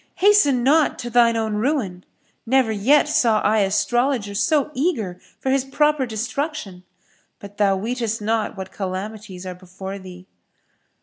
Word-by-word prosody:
Hasten 330 Hz, -12 st, +4 dB
not 300 Hz, +4 st, +3 dB
to 240 Hz, -1 st, -6 dB
shine 235 Hz, -1 st, +4 dB
own 220 Hz, -2 st, -1 dB
ruin: 210 Hz, -8 st, -1 dB, 0.4 s
never 255 Hz, -1 st, +2 dB
yet 255 Hz, +9 st, +3 dB
saw 230 Hz, -7 st, +3 dB
I 215 Hz, +1 st, +2 dB
astrologer 210 Hz, +3 st, 0 dB
so 300 Hz, +7 st, +1 dB
eager 250 Hz, -, -1 dB, 0.2 s
for 265 Hz, -, -1 dB
his 270 Hz, -1 st, +2 dB
proper 295 Hz, 0 st, +1 dB
destruction; 230 Hz, -, -4 dB, 0.5 s
but 200 Hz, 0 st, -12 dB
thou 200 Hz, -2 st, +3 dB
weetest 230 Hz, +1 st, -2 dB
not 215 Hz, 0 st, -1 dB
what 190 Hz, 0 st, -7 dB
calamities 195 Hz, 0 st, -6 dB
are 185 Hz, -, -5 dB
before 190 Hz, +2 st, -8 dB
thee." 185 Hz, -1 st, -12 dB
220 Hz, 140 wpm, -22 LUFS, 195-265 Hz, 0.5 s, Hasten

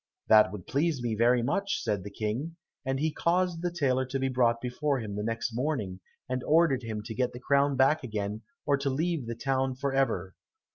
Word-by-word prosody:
"That 110 Hz, -3 st, +7 dB
would 95 Hz, -3 st, -8 dB
please 150 Hz, +1 st, 0 dB
me 120 Hz, -2 st, 0 dB
very 120 Hz, +2 st, +3 dB
much," 200 Hz, +10 st, -1 dB
said 105 Hz, -6 st, -1 dB
the 100 Hz, -, -6 dB
King, 115 Hz, +11 st, -3 dB, 0.3 s
and 135 Hz, 0 st, -1 dB
he 155 Hz, +1 st, 0 dB
caused 175 Hz, 0 st, +1 dB
the 175 Hz, -, 0 dB
tailor 135 Hz, -7 st, +1 dB
to 135 Hz, +1 st, -2 dB
be 135 Hz, 0 st, 0 dB
brought 120 Hz, -2 st, +2 dB
before 135 Hz, +4 st, -1 dB
him 105 Hz, -3 st, -5 dB
next 115 Hz, +2 st, -2 dB
morning, 115 Hz, -8 st, -2 dB, 0.3 s
and 130 Hz, 0 st, -2 dB
ordered 155 Hz, -4 st, +3 dB
him 110 Hz, -3 st, -5 dB
to 110 Hz, -, -6 dB
get 125 Hz, +2 st, -1 dB
the 120 Hz, -, -7 dB
crown 140 Hz, +2 st, +2 dB
back 135 Hz, +4 st, +3 dB
again, 105 Hz, -2 st, -3 dB, 0.2 s
or 145 Hz, -1 st, +3 dB
to 140 Hz, 0 st, -1 dB
leave 155 Hz, -1 st, -1 dB
the 115 Hz, -, -3 dB
town 130 Hz, +2 st, 0 dB
for 140 Hz, +1 st, -2 dB
ever. 95 Hz, -9 st, 0 dB
130 Hz, 205 wpm, -29 LUFS, 115-145 Hz, 0.3 s, That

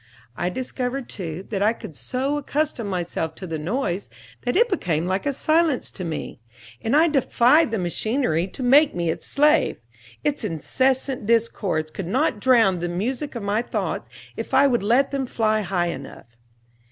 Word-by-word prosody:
I 175 Hz, -, -1 dB
discovered, 255 Hz, +3 st, -3 dB
too, 175 Hz, -1 st, -6 dB
that 200 Hz, -2 st, -1 dB
I 215 Hz, +3 st, +4 dB
could 160 Hz, -, -10 dB
so 265 Hz, -, -2 dB
accustom 285 Hz, -5 st, -2 dB
myself 170 Hz, -4 st, -3 dB
to 185 Hz, -, -8 dB
the 165 Hz, -3 st, -4 dB
noise 195 Hz, -, -2 dB, 0.3 s
that 245 Hz, -, -1 dB
it 470 Hz, +4 st, +5 dB
became 175 Hz, -, -1 dB
like 190 Hz, +8 st, -1 dB
a -, -, +2 dB
silence 310 Hz, 0 st, +1 dB
to 185 Hz, -, -7 dB
me. 160 Hz, -7 st, -5 dB, 0.4 s
And 230 Hz, +5 st, +1 dB
I 320 Hz, +3 st, +6 dB
defied 280 Hz, 0 st, +4 dB
the 225 Hz, -, -1 dB
machinery 185 Hz, -, 0 dB
to 225 Hz, +7 st, -7 dB
make 280 Hz, +5 st, +5 dB
me 170 Hz, -2 st, 0 dB
its -, -, -6 dB
slave. 300 Hz, +2 st, +3 dB, 0.5 s
Its 290 Hz, -4 st, -1 dB
incessant 255 Hz, -, 0 dB
discords 210 Hz, -9 st, +1 dB
could 180 Hz, +1 st, -5 dB
not 255 Hz, -, +1 dB
drown 225 Hz, -8 st, +4 dB
the 175 Hz, +1 st, -2 dB
music 250 Hz, -, -3 dB
of 235 Hz, -, -4 dB
my 205 Hz, +2 st, +1 dB
thoughts 245 Hz, -, -3 dB, 0.3 s
if -, -, -3 dB
I -, -, +6 dB
would 245 Hz, -5 st, +2 dB
let 240 Hz, +7 st, +3 dB
them 275 Hz, -2 st, -2 dB
fly 215 Hz, -2 st, +1 dB
high 175 Hz, -3 st, 0 dB
enough. 120 Hz, -7 st, -9 dB
225 Hz, 175 wpm, -23 LUFS, 180-270 Hz, 0.5 s, I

